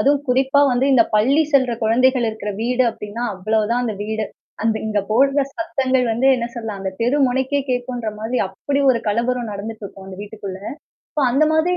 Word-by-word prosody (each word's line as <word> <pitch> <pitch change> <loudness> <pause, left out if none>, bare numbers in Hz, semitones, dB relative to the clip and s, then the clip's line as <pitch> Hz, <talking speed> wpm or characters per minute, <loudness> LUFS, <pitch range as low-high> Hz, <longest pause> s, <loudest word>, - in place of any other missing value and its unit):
அதும் 285 +1 +4
குறிப்பா 265 +2 +3
வந்து 250 +2 +2
இந்த 250 -3 +7
பள்ளி 265 +9 +4
செல்ற 260 -3 +4
குழந்தைகள் 250 +3 +3
இருக்குற 215 -1 -4
வீடு 250 +2 +2
அப்டின்னா, 210 +2 -7
அவ்வளவுதான் 215 +5 0
அந்த 220 -3 -2
வீடு. 220 0 -2 0.4
அந்த 225 -1 +1
இந்த 215 -1 0
போட்ற 275 +5 +3 0.2
சத்தங்கள் 265 -6 0
வந்து 245 +4 +1
என்ன 235 -2 -2
சொல்ல. 210 -5 -4
தெரு 245 +5 +2
முனைக்கே 265 +3 0
கேட்க்குன்ற 245 -2 -2
மாரி 225 +4 -3
அப்டி 275 +9 -2
ஒரு 245 - +2
களோபரம் 235 +2 0
நடந்துட்டுருக்கும் 200 -1 -7
அந்த 190 -1 -9
வீட்டுக்குள்ள. 200 -2 -7 0.6
சோ - - +2
அந்த 275 +5 +3
மாதிரி 340 +3 +2
240 Hz, 170 wpm, -20 LUFS, 215-260 Hz, 0.6 s, இந்த